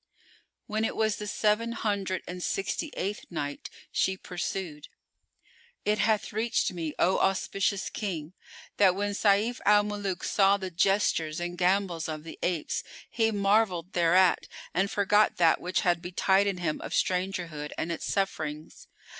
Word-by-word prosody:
When 215 -1 -2
it - - -1
was 220 -1 +1
the 210 - -5
Seven 215 +3 +1
Hundred 200 -5 -2
and 180 0 -6
Sixty 195 - -2
eighth 200 +3 -3
Night, 145 -4 -4 0.2
She 190 0 +1
pursued, 175 -4 -5 1.0
It 210 0 +1
hath 215 0 +1
reached 225 0 0
me, 165 -4 -4
O 185 - +3
auspicious 195 +1 0
King, 175 -6 -4 0.4
that 190 -3 +5
when 205 +1 -1
Sayf 210 +4 +2
al 205 0 +5
Muluk 205 -3 -3
saw 200 0 +4
the 190 -2 -5
gestures 170 -3 +1
and 175 0 -4
gambols 180 -2 +1
of 155 -1 -5
the 165 - -10
apes, 175 -4 -1 0.3
he 225 -1 +2
marvelled 200 -4 +1
thereat 175 +1 +4 0.3
and 190 +3 +1
forgot 205 +1 +3
that 165 -2 +4
which 180 +1 0
had 175 -1 +1
betided 190 +2 +2
him 165 -4 -2
of - - -6
strangerhood 180 -5 -1
and 170 - -2
its 165 - -3
sufferings. 155 -6 -3
190 Hz, 145 wpm, -28 LUFS, 175-205 Hz, 1.0 s, that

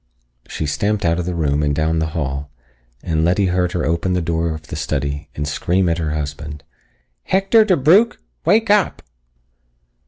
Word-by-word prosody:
She 80 - -4
stamped 100 +8 -1
out 85 +1 +2
of 90 - -3
the 90 - -2
room 75 -3 0
and 75 -1 0
down 80 +2 +1
the 80 - 0
hall, 70 -1 -3 0.5
and 80 -3 0
Letty 90 +4 +2
heard 90 -1 0
her 90 - -1
open 85 +3 0
the 90 - +1
door 80 0 -1
of 80 - -10
the - - -7
study 70 -1 -3
and 75 0 -3
scream 90 +5 0
at 85 0 0
her 80 -2 -2
husband. 75 0 -5 0.6
"Hector 195 +4 +4
DeBrugh! 190 - +4 0.3
Wake 210 +5 +3
up!" 210 -2 +2
85 Hz, 175 wpm, -19 LUFS, 75-95 Hz, 0.6 s, Hector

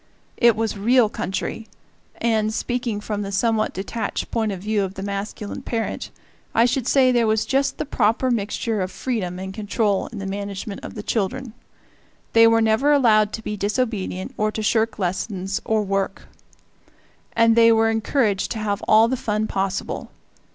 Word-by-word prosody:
It 235 -3 +5
was 225 0 -1
real 235 +1 +4
country, 215 +3 -4 0.5
and 220 -2 +1
speaking 240 -1 -2
from 210 -1 -3
the 200 -1 -4
somewhat 220 +2 +1
detached 210 +4 -4
point 220 -2 0
of 190 - -5
view 210 +1 0
of 195 0 -3
the 195 - -5
masculine 200 +1 -5
parent 225 -2 -3 0.5
I 230 - +5
should 250 0 0
say 260 -2 +4
there 240 -2 +3
was 215 0 +1
just 275 +3 0
the - - -2
proper 245 -1 +1
mixture 215 -1 -1
of 185 0 -3
freedom 200 -9 -3
and 190 +1 -6
control 210 -1 0
in 230 - -9
the 195 - -5
management 200 +1 -5
of - - -8
the 210 - -6
children. 235 +4 -2 0.8
They 230 0 +7
were 225 0 +4
never 220 +6 +3
allowed 215 -7 +4
to 225 - -5
be 210 - -3
disobedient 205 -3 -2
or 215 0 +1
to 220 - -3
shirk 220 +1 +1
lessons 190 0 -2
or 220 -1 +1
work; 195 -1 -2 1.1
and 230 0 +4
they 230 0 +6
were 225 0 +3
encouraged 220 -2 0
to - - -6
have 210 -1 -2
all 220 +1 +6
the 260 - 0
fun 215 -3 -1
possible. 195 -2 -3
215 Hz, 170 wpm, -22 LUFS, 200-230 Hz, 1.1 s, They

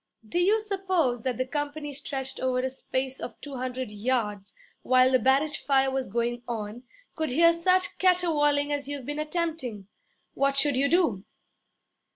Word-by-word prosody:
'Do 345 - -1
you 405 +5 +4
suppose 375 - 0
that 250 -1 -2
the 255 - 0
company 290 +1 -4
stretched 265 -1 -4
over 255 -1 0
a 260 0 -2
space 265 0 -3
of 240 - -7
two 280 -2 -7
hundred 255 -2 -4
yards, 210 -3 -2 0.3
while 255 0 +4
the 255 - +4
barrage 275 +5 +2
fire 270 -1 +2
was 265 -3 -2
going 235 +1 -1
on, 225 -1 -5 0.3
could 315 -1 -1
hear 335 +6 +5
such 365 +2 +1
caterwauling 295 -6 +2
as 285 -1 -3
you've 285 -3 -5
been 295 +2 -4
attempting? 305 - -3 0.5
What 275 0 +1
should 285 -1 +3
you 275 +2 +2
do?' 295 - +2
270 Hz, 165 wpm, -27 LUFS, 250-310 Hz, 0.5 s, hear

